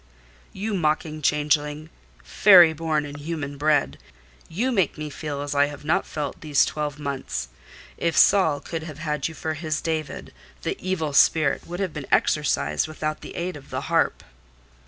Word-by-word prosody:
"You 210 +3 -4
mocking 155 -3 -1
changeling—fairy 150 +4 +3
born 155 -1 -1
and 145 0 -8
human 145 -2 -5
bred! 150 -1 +1 0.5
You 230 +11 -1
make 190 - +1
me 150 -1 -5
feel 145 -2 -5
as 145 0 -4
I 145 0 +3
have 145 0 -10
not 155 - +1
felt 145 -3 -5
these 145 -2 +3
twelve 150 -2 -3
months. 140 - -4 0.5
If 165 -2 -1
Saul 160 -8 +5
could 165 -1 -5
have 155 -3 -8
had 150 -2 -2
you 160 - -9
for 160 0 -3
his 155 0 -2
David, 160 -2 -4 0.3
the - - -1
evil 160 -6 -2
spirit 155 +1 +3
would 175 +2 -6
have 190 -4 -2
been 145 -4 -6
exorcised 150 +1 +1
without 155 0 -4
the - - -9
aid 175 +1 -3
of 140 -2 -12
the - - -3
harp." - - 0
155 Hz, 165 wpm, -24 LUFS, 145-165 Hz, 0.5 s, Saul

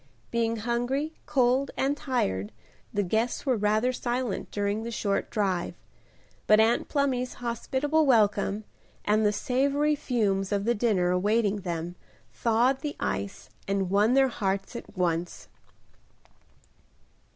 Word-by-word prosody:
Being 230 -1 +1
hungry, 245 +7 -1
cold 260 -1 +2
and 275 +2 +1
tired, 105 - -1 0.4
the 205 -1 0
guests 220 +9 -1
were 260 -3 +2
rather 215 +4 +1
silent 245 -3 -2
during 205 +1 -1
the 230 - -5
short 205 -3 -1
drive, 190 -6 -1 0.7
but 215 0 +6
Aunt 225 +2 +3
Plumy's 260 -4 0
hospitable 265 +6 0
welcome, 210 -3 +3 0.4
and 215 +1 +3
the 210 - +4
savory 280 +7 +1
fumes 210 -9 0
of 200 -1 0
the 235 - +3
dinner 205 -6 +1
awaiting 205 +3 +2
them, 175 -3 -4 0.4
thawed 240 +4 +2
the 290 0 -4
ice 100 +1 -4 0.2
and 195 -2 -1
won 210 +5 +4
their 270 -1 +5
hearts 195 -1 -2
at 225 -4 -9
once. 175 -1 -2
225 Hz, 130 wpm, -27 LUFS, 200-255 Hz, 0.7 s, but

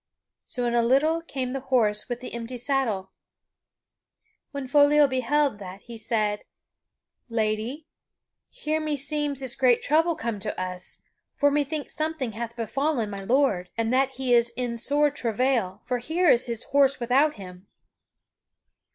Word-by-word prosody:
So 245 -1 -2
in 240 - 0
a 240 - +4
little 285 +7 +3
came 260 -6 -4
the 270 - -2
horse 245 -5 0
with 245 0 -4
the 255 - -8
empty 235 +1 -5
saddle. 235 -7 -1 1.4
When 280 -3 -5
Foliot 290 +1 +5
beheld 260 -1 +1
that 190 0 -9
he 235 - -10
said: 215 -2 -1 0.9
"Lady, 225 +6 -2 0.6
here 315 -11 -2
meseems 295 -2 -1
is 255 -2 -2
great 250 -3 +3
trouble 325 +3 +2
come 230 -5 -3
to - - -4
us, 180 -1 -5 0.3
for 285 0 +3
methinks 290 +1 -2
something 310 -6 -2
hath 235 +2 -6
befallen 240 0 -1
my 195 -1 -6
lord, 205 -6 +1
and 230 +1 0
that 265 +1 +2
he 260 -1 0
is 235 0 +4
in 245 -2 -2
sore 290 +4 +2
travail, 235 -6 -1
for 250 -1 -1
here 330 +8 0
is 245 0 +4
his 235 -1 -4
horse 275 -1 +3
without 265 +5 +2
him." 185 -2 -11
255 Hz, 150 wpm, -26 LUFS, 225-285 Hz, 1.4 s, Foliot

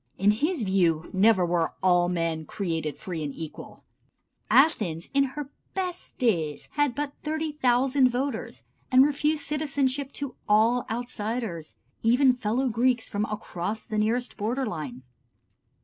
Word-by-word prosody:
In 200 +2 +4
his 300 - 0
view 175 -5 +1
never 195 -1 +4
were 170 -1 0
"all 175 -1 +4
men 165 -2 -1
created 165 -5 -3
free 175 -4 -5
and 145 -2 -4
equal." 160 -2 -9 0.7
Athens 210 - +3
in 275 0 +4
her 280 +1 -6 0.2
best 365 -2 -4
days 165 - 0
had 290 -4 +1
but 290 0 -3
30,000 275 -4 +2
voters, 250 -1 -3 0.3
and 260 +1 +7
refused 295 +1 0
citizenship 280 -2 -1
to 280 -3 -5 0.2
all 225 +4 +4
outsiders, 225 -7 -4 0.3
even 250 +3 +5
fellow 245 +2 0
Greeks 245 0 +1
from 205 +1 -1
across 210 -1 -4
the 215 -1 -2
nearest 235 +4 0
border 240 +6 -1
line. 150 - -5
230 Hz, 135 wpm, -26 LUFS, 180-275 Hz, 0.7 s, and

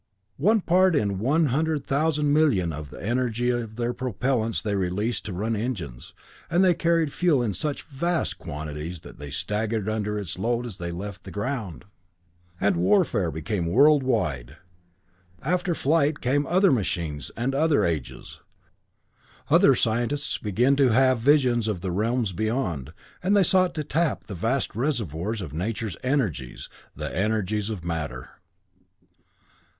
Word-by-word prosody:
One 210 +8 +3
part 185 0 +3
in 100 -8 0
one 150 +9 +2
hundred 155 0 0
thousand 150 0 +1
million 110 - +3
of 75 -1 -7
the - - -11
energy 120 +1 0
of 115 -3 -3
their 120 +1 -1
propellents 120 -1 -1
they 105 -2 -2
released 100 +5 -1
to 105 - -4
run 110 +6 -1
the 105 - -1
engines, 90 - -5 0.3
and 175 +3 +3
they 185 -2 +5
carried 165 -3 +1
fuel 160 -8 +2
in 110 -4 -1
such 145 +8 -3
vast 170 +4 -2
quantities 75 +3 -6
that - - -13
they 75 0 -7
staggered 105 +7 -2
under 105 -1 -1
its 95 -4 -4
load 120 +3 0
as 110 -6 -7
they 85 -3 -4
left 90 +1 -7
the - - -9
ground! 105 -5 -4 0.7
And 100 -3 +2
warfare 95 - +2
became 85 +4 -3
world 140 - +5
wide. 75 - -1 0.9
After 180 +3 0
flight 150 0 +2
came 140 +3 +1
other 185 +1 +4
machines 85 - -1
and 125 +4 -1
other 150 +1 +3
ages. 80 -6 -4 1.1
Other - - +6
scientists 120 +6 0
began 120 +6 +2
to 135 -3 +4
have 130 +1 +4
visions 125 -3 +3
of 100 -5 -2
the 95 -1 -3
realms 110 +2 0
beyond, 90 - -2 0.3
and 195 +3 +3
they 200 - +5
sought 185 0 +3
to 155 - -2
tap 155 +1 0
the 105 - -8
vast 115 +7 -1
reservoirs 110 - -2
of 75 -6 -7
Nature's 105 +4 -3
energies, 110 - -2 0.3
the - - -5
energies 105 +1 0
of 95 -6 -5
matter. 75 -7 -4
115 Hz, 155 wpm, -25 LUFS, 95-140 Hz, 1.1 s, Other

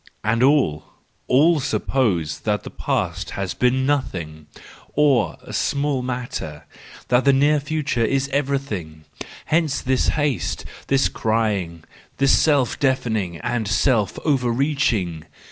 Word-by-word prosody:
And 110 +2 +1
all, 130 - +3 0.4
all, 155 +5 +4
suppose 100 - 0
that 105 -1 -1
the - - -8
past - - -2
has 95 -2 -2
been 130 +1 +1
nothing, 85 - -2 0.5
or 135 - +2
a - - -10
small 140 -2 0
matter, 120 - -5 0.4
that 125 +1 +3
the 140 - +5
near 145 +2 +3
future 145 -5 -1
is 135 +4 +1
everything: 135 - -3 0.4
hence 155 -3 +1
this 130 -1 0
haste, 145 -4 -1 0.2
this 135 0 +3
crying, 105 -7 -1 0.3
this 135 0 +3
self 140 -6 +2
deafening 110 -10 0
and 120 -2 -2
self 110 -2 +1
overreaching 125 - 0
125 Hz, 120 wpm, -22 LUFS, 105-140 Hz, 0.5 s, the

